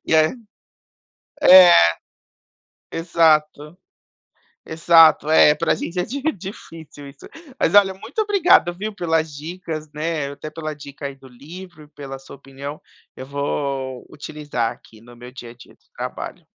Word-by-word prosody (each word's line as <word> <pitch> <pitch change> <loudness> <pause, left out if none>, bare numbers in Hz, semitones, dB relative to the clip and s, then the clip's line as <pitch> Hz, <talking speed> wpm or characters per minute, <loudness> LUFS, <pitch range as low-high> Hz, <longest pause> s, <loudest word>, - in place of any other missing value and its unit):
E - - 0
aí 155 +7 +3 1.1
é, 180 -1 +9 1.2
exato, 155 -2 +1 0.9
exato, 160 -1 +4
é 150 -1 +5
pra 165 +2 0
gente 175 +1 -5
é - - 0
di 275 +4 -6 0.2
difícil 165 -6 -11
isso. 135 - -16 0.3
Mas - - +1
olha, 195 -2 +5
muito 220 - -9
obrigado 365 - +3
viu, 210 +4 -6
pelas 160 -5 -1
dicas, 155 0 -7
né. 150 -2 -3
Até 155 +2 -9
pela 155 -1 -6
dica 140 -1 -11
aí 140 -1 -6
do 135 0 -17
livro 155 +6 -13
e - - -17
pela 140 -2 -10
sua 135 - -13
opinião, 140 +2 -10 0.3
eu 130 - -9
vou 140 -2 -4
utilizar 145 -6 -4
aqui 110 -1 -17
no 120 +1 -16
meu 125 +1 -12
dia 120 -2 -11
a - - -14
dia 120 - -17
do - - -33
trabalho. - - -7
155 Hz, 150 wpm, -20 LUFS, 140-170 Hz, 1.2 s, é